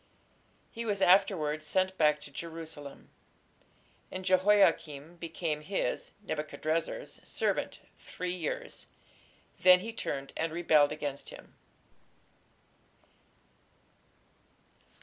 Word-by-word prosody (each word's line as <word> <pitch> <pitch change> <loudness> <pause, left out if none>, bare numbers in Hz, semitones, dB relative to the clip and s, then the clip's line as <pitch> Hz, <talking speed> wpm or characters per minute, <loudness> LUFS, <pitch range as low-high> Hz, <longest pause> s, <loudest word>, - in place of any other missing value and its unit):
He 230 - -5
was 205 -3 -1
afterwards 175 -6 +3
sent 185 +2 +1
back 150 -3 +4
to 145 - -10
Jerusalem. 160 -2 -8 1.0
"And 185 0 -6
Jehoiakim 185 -5 +3
became 165 -2 -3
his 190 +6 -2
(Nebuchadrezzar's) 160 - -3
servant - - -1 0.2
three 180 0 -4
years: 170 -4 -4 0.7
then 180 0 +7
he 225 +3 -5
turned 140 -11 -4
and 165 0 -1
rebelled 155 -3 +4
against 145 -2 -4
him." - - -12
165 Hz, 90 wpm, -31 LUFS, 150-185 Hz, 1.0 s, then